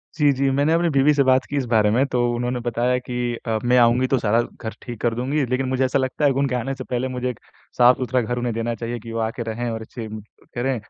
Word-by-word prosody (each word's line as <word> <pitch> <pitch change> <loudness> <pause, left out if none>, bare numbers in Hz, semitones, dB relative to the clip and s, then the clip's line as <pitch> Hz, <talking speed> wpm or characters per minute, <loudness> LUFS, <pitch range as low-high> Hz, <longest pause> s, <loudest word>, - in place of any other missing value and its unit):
जी, 150 -3 +4
जी। 135 +1 +1
मैंने 145 +4 +2
अपनी 170 0 +2
बीवी 140 0 +4
से 140 -1 +3
बात 130 0 +3
की 145 - -4
इस 135 - 0
बारे 105 -2 +4
में, 125 +5 +3
तो 120 -2 +1
उन्होंने 125 +1 -2
बताया 120 +2 +1
कि 125 -1 -3
अ, 110 -1 0
मैं 125 +1 +3
आऊँगी 120 +1 +4
तो 135 - +2
सारा 115 0 +2
घर 110 -1 -7
ठीक 120 -3 -8
कर 120 - +1
दूँगी 135 +4 0
लेकिन 130 +2 -1
मुझे 130 0 +1
ऐसा 130 +1 +1
लगता 130 +3 -1
है 140 - +5
उनके 135 -1 0
आने 130 +3 -2
से 130 - -7
पहले 125 0 -2
मुझे 125 -1 -3
एक 125 - -7 0.4
साफ़-सुथरा 125 0 +4
घर 120 +2 -3
उन्हें 120 -1 -1
देना 115 +1 -2
चाहिए, 120 +1 -5
कि 115 +1 -9
वो 115 - -3
आके 115 +2 -2
रहें 115 +2 -3
और 110 0 -4
अच्छे 110 0 -7 0.5
करें 130 +2 -1
125 Hz, 260 wpm, -22 LUFS, 120-130 Hz, 0.5 s, है